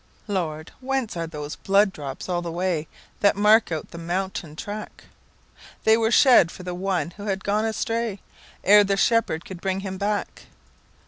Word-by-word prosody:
"Lord, 165 -6 -3
whence 265 -4 -2
are 165 -1 -3
those 150 -2 -6
blood 195 0 +3
drops 140 -2 -7
all 175 -1 -1
the 170 -1 -5
way, 170 -2 -1 0.3
That 200 0 +4
mark 210 0 +4
out 160 -2 -4
the 170 - -8
mountain 175 -2 -3
track?""They 215 +2 -4
were 225 0 +1
shed 240 - +6
for 180 - -10
one 180 -1 -1
who 205 0 -7
had 195 -1 -2
gone 210 +2 +1
astrayEre 225 -1 -2 0.7
the 195 0 0
Shepherd 200 -7 +1
could 185 -2 -9
bring 190 0 -1
him 190 -1 -5
back." 205 0 -3
195 Hz, 155 wpm, -24 LUFS, 170-210 Hz, 0.7 s, shed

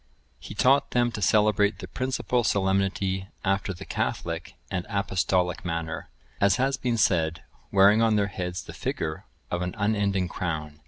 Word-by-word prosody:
(991) - - -10
He 100 - -8
taught 135 +5 +3
them 120 0 +3
to 105 - -5
celebrate 105 0 +3
the 95 - -8
principal 125 +3 -1
solemnity 95 -1 0 0.2
after 95 0 +1
the 90 - -8
catholic - - -3 0.2
and 90 -2 -2
apostolic 95 -2 0
manner, 85 -2 -4 0.3
as 100 0 +4
has 135 +2 +1
been 125 -2 -1
said, 85 -6 +2 0.3
wearing 100 +3 +6
on 115 -1 +4
their 105 -1 +3
heads 90 -2 -4
the - - -10
figure 80 -1 -3 0.3
of 90 - -1
an 90 0 -3
unending 100 -3 +1
crown. 75 -5 -4
100 Hz, 160 wpm, -26 LUFS, 90-105 Hz, 0.3 s, wearing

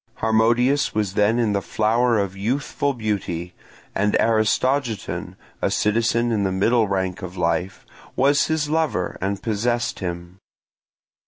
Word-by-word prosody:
Harmodius 120 +4 +2
was 105 -3 0
then 105 +3 +2
in 115 -4 +1
the 100 - 0
flower 115 +4 +1
of 100 -2 -1
youthful 130 +7 -1
beauty, 95 -7 -3 0.4
and 105 +1 +1
Aristogiton, 115 +1 0 0.3
a - - +1
citizen 115 +2 +1
in 110 -3 +1
the 95 - 0
middle 110 +4 +2
rank 95 -1 -2
of 90 0 -7
life, 90 +2 -1 0.3
was 140 +2 +3
his 160 -2 0
lover 155 - -1
and 100 +1 -2
possessed 120 +2 -1
him. 85 0 -6
110 Hz, 135 wpm, -22 LUFS, 95-120 Hz, 0.4 s, was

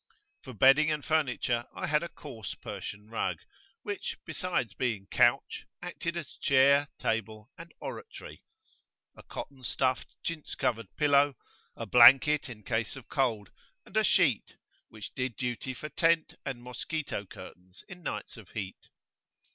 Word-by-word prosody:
For 130 - -9
bedding 135 +7 +6
and 150 -2 -1
furniture 125 -6 +1
I - - -3
had 150 0 +2
a 170 - -4
coarse 120 -11 -8
Persian 105 +1 -7
rug 115 - -1 0.5
which, 410 -2 -4
besides 175 - -2
being 115 -6 -2
couch, 125 +2 +2
acted 175 -1 -4
as 170 - -6
chair, 140 +1 +5
table, 110 +2 -2
and 165 0 -11
oratory 465 - -8 0.7
a - - -12
cotton 135 -2 -8
stuffed 130 0 -1
chintz 165 -2 -4
covered 115 -3 -1
pillow, 145 -2 +4 0.4
a - - -5
blanket 135 +4 +7
in 105 -3 -10
case 110 +2 -1
of 130 -3 -12
cold, 115 -7 0 0.3
and - - -15
a 220 - +4
sheet, 155 - +2 0.3
which 110 -1 -9
did 125 -3 -2
duty 125 +1 -3
for 150 - -7
tent 165 0 +2
and 130 -3 -5
mosquito 125 -3 -4
curtains 90 0 -12
in 180 -3 -11
nights 165 - -5
of 110 -5 -13
heat. 95 -3 -6
130 Hz, 145 wpm, -30 LUFS, 115-150 Hz, 0.7 s, blanket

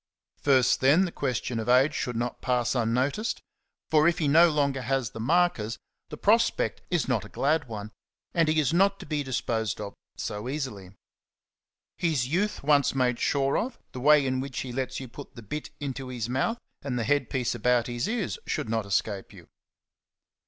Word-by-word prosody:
First, 130 -3 +3
then, 150 +8 +5
the 175 - -4
question 125 -4 -2
of 110 - -3
age 130 +4 +5
should 125 -4 -3
not 120 +1 -3
pass 125 -2 +1
unnoticed; 130 - 0 0.5
for 155 0 +5
if 170 - +2
he 155 - 0
no 165 +4 +6
longer 140 -3 0
has 130 -2 -1
the - - -8
markers, 125 -5 +1
'^ - - -40 0.3
the - - -7
prospect 230 +3 +2
is 175 -4 0
not 120 -6 +1
a 105 - -11
glad 150 +1 0
one, 105 -2 -6 0.4
and 165 -2 +3
he 155 0 +3
is 150 0 +1
not 195 +3 +3
to - - -8
be 150 -2 -1
disposed 115 -5 -2
of 100 -1 -6 0.2
so 105 +4 -4
easily. 130 -10 -4 1.1
His 155 -8 0
youth 185 +7 -1
once 140 -2 +3
made 125 -2 +1
sure 140 -1 +1
of, 240 +1 -4
the 130 - -7
way 150 +1 +5
in 130 0 0
which 135 -1 -4
he 125 -2 -6
lets 130 0 -3
you 130 - -7
put 140 +4 -11
the 115 - -10
bit 150 +9 -5
into 135 -2 -4
his 120 -3 -4
mouth, 135 - 0 0.2
and 135 -3 -3
the 120 - 0
head 145 +5 +1
piece 125 -3 -1
about 120 0 +2
his 120 - -2
ears, 220 -5 -2
should - - -2
not 110 -2 -1
escape 100 0 -1
you. - - -15
130 Hz, 195 wpm, -27 LUFS, 120-150 Hz, 1.1 s, no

